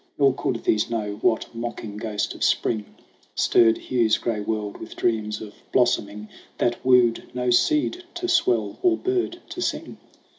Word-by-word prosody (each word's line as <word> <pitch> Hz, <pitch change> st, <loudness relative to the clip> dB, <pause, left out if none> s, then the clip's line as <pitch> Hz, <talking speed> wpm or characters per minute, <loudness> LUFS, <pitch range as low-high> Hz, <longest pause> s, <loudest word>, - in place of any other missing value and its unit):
Nor 140 Hz, -2 st, +4 dB
could 120 Hz, -3 st, -3 dB
these 105 Hz, -, +1 dB
know 105 Hz, -3 st, -3 dB
what 110 Hz, -, +1 dB
mocking 115 Hz, -3 st, -6 dB
ghost 105 Hz, -1 st, -2 dB
of -, -, -5 dB
Spring 110 Hz, -3 st, +1 dB, 0.5 s
Stirred 115 Hz, -1 st, +4 dB
Hugh's 115 Hz, -4 st, +1 dB
gray 115 Hz, -3 st, -2 dB
world 105 Hz, -1 st, -3 dB
with 110 Hz, -, -10 dB
dreams 105 Hz, -2 st, -1 dB
of 105 Hz, -1 st, -9 dB, 0.2 s
blossom 120 Hz, -4 st, +2 dB
ing 105 Hz, +1 st, -9 dB, 0.3 s
That 120 Hz, 0 st, 0 dB
wooed 125 Hz, -2 st, +4 dB
no 125 Hz, 0 st, 0 dB
seed 310 Hz, -, +2 dB
to 355 Hz, +1 st, -3 dB
swell 355 Hz, +2 st, +1 dB
or 360 Hz, -3 st, +3 dB
bird 365 Hz, -1 st, -1 dB
to 360 Hz, -, -6 dB
sing. -, -, -3 dB
115 Hz, 160 wpm, -24 LUFS, 110-135 Hz, 0.5 s, Nor